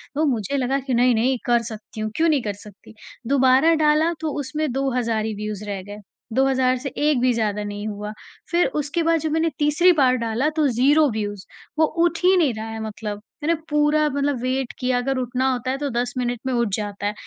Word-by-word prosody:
तो 310 +2 +2
मुझे 265 0 -1
लगा 265 +1 0
कि 265 -1 -4
नहीं, 245 0 +4
नहीं 250 +4 +1
कर 240 -1 +3
सकती 215 0 -10
हूँ, 215 0 -2
क्यों 330 +1 +3
नहीं 295 -4 +2
कर 205 - -2
सकती? 205 +2 -15 0.3
दोबारा 265 +4 +4
डाला 310 +3 +3
तो 315 -2 -2
उसमें 300 +1 -2
2000 270 +2 0
हज़ार 225 -3 0
ही 220 - -2
व्यूज़ 210 0 -5
रह 200 -2 -4
गए, 205 +2 -9 0.4
2000 265 +3 +3
हज़ार 255 -1 +2
से 270 +3 -5
एक 295 -2 +2
भी 255 0 +3
ज़्यादा 210 -2 -1
नहीं 205 +1 -5
हुआ, 210 0 -5 0.4
फिर 345 +1 +3 0.2
उसके 295 +4 -2
बाद 330 0 +2
जब 315 0 -2
मैंने 320 +1 +1
तीसरी 300 +5 +4
बार 265 -5 +3
डाला 230 +5 0
तो 310 -2 +3
0 280 +5 +3
व्यूज़, 205 -2 -4 0.3
वो 315 - +6 0.2
उठ 340 -1 +1
ही 370 +1 +5
नहीं 305 -8 +3
रहा 220 0 -6
है 225 0 -6
मतलब। 210 -1 -5 0.2
मैंने 335 +3 +2
पूरा 300 +1 +3
मतलब 280 -2 -1
वेट 255 0 -1
किया, 255 -1 +1
अगर 265 +2 -1
उठना 255 +1 0
होता 255 0 -2
है 265 - -2
तो 285 0 -2
10 245 0 -2
मिनट 245 -1 -1
में 260 - -1
उठ 235 -1 +1
जाता 205 -1 -5
है, 205 - -1
255 Hz, 225 wpm, -22 LUFS, 220-295 Hz, 0.4 s, वो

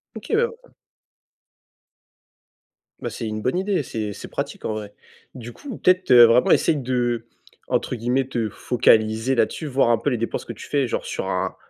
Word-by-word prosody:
OK - - -7
bah 470 +2 -2 2.3
bah, - - -3
c'est 115 - -5
une 110 0 -4
bonne 130 +9 0
idée, 190 -4 0
c'est 110 -4 -4
c'est - - -9
pratique - - -5
en - - -1
vrai. 105 -1 -7 0.4
Du 120 -2 -9
coup 270 -7 -9
peut-être, 185 -3 +2
heu, 120 -1 +10
vraiment 115 +2 +4
essayer 155 - +3
d'entre 120 -2 -3
guillemets 125 +3 0
te 115 -4 -2
«focaliser» 110 +2 +2
là-dessus. 125 +6 0
Voir 135 -3 +2
un 120 - +4
peu 130 - 0
les 125 - -1
dépenses 115 +1 -3
que 115 - -6
tu 105 - -11
fais, 140 -3 0
genre - - -3
sur - - -4
un - - -2
120 Hz, 175 wpm, -22 LUFS, 115-140 Hz, 2.3 s, heu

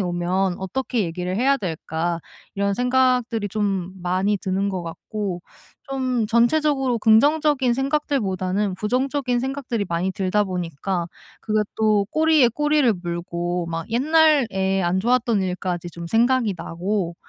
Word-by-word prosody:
오면 180 +1 0
어떻게 245 +5 -2
얘기를 180 +2 -3
해야 275 +4 +3
될까?' 165 -2 -3 0.3
이런 200 0 0
생각들이 250 -2 +1
좀 195 -3 -2
많이 190 +3 +1
드는 195 +2 -1
것 185 -2 -3
같고 180 +1 -5 0.5
좀 255 -4 0
전체적으로 260 +2 +2
긍정적인 270 +3 +3
생각들보다는 210 - -1
부정적인 250 +3 0
생각들이 260 -5 -3
많이 175 +2 -1
들다 200 +1 0
보니까 175 -1 -3 0.4
그게 215 -1 +1 0.2
또 215 -2 +2
꼬리에 310 -5 +4
꼬리를 295 0 +2
물고 175 0 -3
막 165 +4 -5
옛날에 245 -9 +3
안 175 +2 +1
좋았던 235 -2 +2
일까지 180 -1 -3
좀 170 +1 -8
생각이 230 0 +2
나고 175 +1 -3
210 Hz, 295 characters per minute, -22 LUFS, 180-255 Hz, 0.5 s, 꼬리에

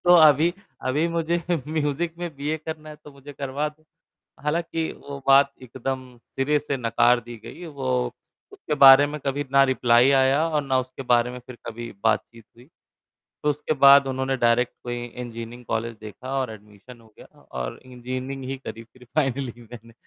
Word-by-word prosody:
तो 175 0 +7
अभी, 160 +1 +6 0.3
अभी 150 +6 0
मुझे 170 +1 -1 0.3
म्यूज़िक 155 +2 -1
में 175 -1 -4
बी. 145 +1 -4
ए 155 - 0
करना 155 -1 -6
है 150 - -9
तो 150 - -11
मुझे 140 +1 -12
करवा 140 +2 -3
दो। 155 +1 -19 0.6
हालाँकि 165 +1 -1
वो 140 -1 -8
बात 140 +1 +6
एकदम 130 0 -6
सिरे 135 +5 0
से 140 -2 -3
नकार 120 0 +3
दी 120 0 -8
गयी। 175 - -9
वो 130 -5 -2 0.4
उसके 400 - -5
बारे 135 +1 +10
में 150 +1 -6
कभी 140 +1 -1
ना 135 0 +6
रिप्लाई 125 0 +4
आया 135 +3 +3
और 150 -2 +1
ना 130 -1 +1
उसके 130 +1 -7
बारे 120 0 +3
में 125 - -8
फिर 125 - -10
कभी 115 +1 -6
बातचीत 115 0 -1
हुई। 120 +3 -18 0.8
तो 150 - +2
उसके 150 +2 -2
बाद 140 0 +9
उन्होंने 130 0 -1
डायरेक्ट 120 0 +2
कोई 120 0 -3
इंजीनियरिंग 120 0 -8
कॉलेज 115 +1 -3
देखा 130 +6 -6
और 125 -4 -3
एडमिशन 105 +3 -14
हो 110 - -20
गया - - -13
था - - -21 0.2
और - - -6
इंजीनियरिंग 130 +2 -6
ही 135 - -3
करी 115 +1 -7
फिर 125 +2 -19
फाइनली 135 -4 -1
मैंने। 115 0 -11
130 Hz, 180 wpm, -24 LUFS, 120-150 Hz, 0.8 s, बारे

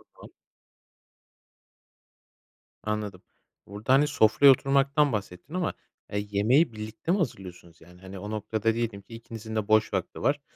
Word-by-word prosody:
Tamam. - - -14 2.5
Anladım. 105 -3 -3 0.5
Burada, 105 +5 -1
hani, 145 +2 +5
sofraya 140 0 +6
oturmaktan 140 +2 +2
bahsettin. 100 - -5
Ama 180 -2 -1 0.4
ya, 105 - -2
yemeği 105 +8 +2
birlikte 110 +8 -5
mi 190 - +3
hazırlıyorsunuz 90 - -5
yani? 90 +2 -17
Hani, 95 0 -9
o 105 +2 -6
noktada 110 +1 -1
diyelim 115 -3 -3
ki 115 - -16
ikinizin 115 -1 -8
de 110 -2 -1
boş 110 0 +3
vakti - - -3
var, - - +1
110 Hz, 135 wpm, -27 LUFS, 100-135 Hz, 2.5 s, sofraya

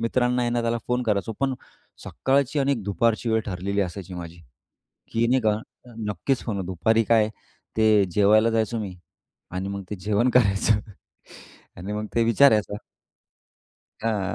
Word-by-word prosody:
मित्रांना 125 +1 +1
आहे 120 - 0
ना, 120 0 0
त्याला 115 0 0
फोन 125 0 +1
करायचो. 105 -2 -1
पण 135 -1 +1 0.5
सकाळची 140 +2 0
आणि 140 0 +2
दुपारची 115 +3 0
वेळ 110 - +2
ठरलेली 100 +1 -2
असायची 95 0 -4
माझी 85 -1 -8 0.7
की 115 +1 +1
नाही 130 +1 +2
का, 105 -1 +2 0.5
नक्कीच 110 +7 -1
फोन 100 -5 -3
दुपारी 110 +6 +1
काय 110 -1 +3 0.5
ते 110 -2 +5
जेवायला 105 +4 +4
जायचो 115 0 0
मी 95 -4 -5 0.6
आणि 95 +2 -3
मग 100 0 -5
ते 105 - -3
जेवण 105 +5 +1
करायचं 105 -3 +3 1.0
आणि 100 +4 -5
मग 105 0 -3
ते 115 - +4
विचारायचं. 110 -3 +4 1.3
हां, 105 -4 -1
110 Hz, 145 wpm, -24 LUFS, 100-120 Hz, 1.3 s, ते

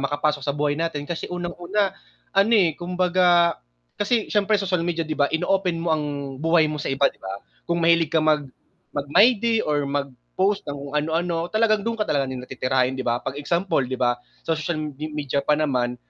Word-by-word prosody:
makapasok 145 +1 0
sa 140 - 0
buhay 145 0 0
natin 155 -3 -3
kasi 170 - -4
unang-una 175 +3 -2 0.4
ano, 200 +4 +4
eh, 175 -8 +3
kumbaga 175 -1 +3 0.4
kasi 220 +1 0
siyempre 210 0 +2
social 180 -3 0
media 170 -1 -1
'di 155 -1 -4
ba, 145 - +3
in-open 180 0 0
mo 170 - -2
ang 150 - -3 0.3
buhay 160 +1 +3
mo 150 - -3
sa 145 -2 -3
iba 135 +1 +3
'di - - -15
ba? 95 +1 -7 0.2
Kung 170 0 -1
mahilig 165 -1 +3
ka 160 - +4
mag 155 -1 +2 0.5
mag-my 145 +10 +5
day 230 -1 +2
or 145 -2 0
mag-post 140 - -1
ng 145 - -3
kung 140 0 -8
ano-ano, 165 +3 0
talagang 215 0 +2
dun 230 +3 -2
ka 215 - 0
talaga 140 -7 0
nila 130 -1 -5
titirahin 130 0 0
'di 130 - -3
ba? 120 0 +1
Pag 140 +2 -4
example 170 +3 0
'di 130 - -3
ba, 120 -1 +1 0.2
sa 165 - 0
social 160 +1 -2
me 155 -1 -4 0.2
media 145 -2 -1
pa 150 +2 +2
naman 125 -5 0
160 Hz, 200 wpm, -23 LUFS, 140-180 Hz, 0.5 s, mag-my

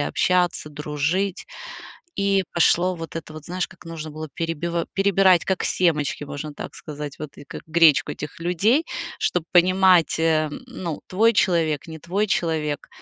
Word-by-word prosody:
общаться, 180 +1 +1
дружить, 150 +6 -2 0.7
и 195 -1 +2
пошло 175 +2 +3
вот 165 0 -7
это 160 - -7
вот, 155 -1 -9
знаешь, 180 +2 -3
как 180 - -17
нужно 160 -2 -6
было 155 +1 -7
перебива 170 0 -2
перебирать, - - -67
перебирать, 195 -2 +4
как 190 -2 0
семечки, 150 -5 0
можно 145 +1 -6
так - - -8
сказать. 150 -1 -7
Вот 150 -2 -8
и - - -11
как - - -9
гречку 160 -3 +4
этих 150 +4 -8
людей, 200 - +2 0.3
чтоб 180 -3 0
понимать, 185 -2 +4
э, 160 -1 +2
н - - -8
ну, 170 -5 -5
твой 225 +5 +3
человек, 165 -7 +1
не 160 0 -8
твой 195 +7 -1
человек. 155 -5 -1
165 Hz, 160 wpm, -23 LUFS, 155-185 Hz, 0.7 s, перебирать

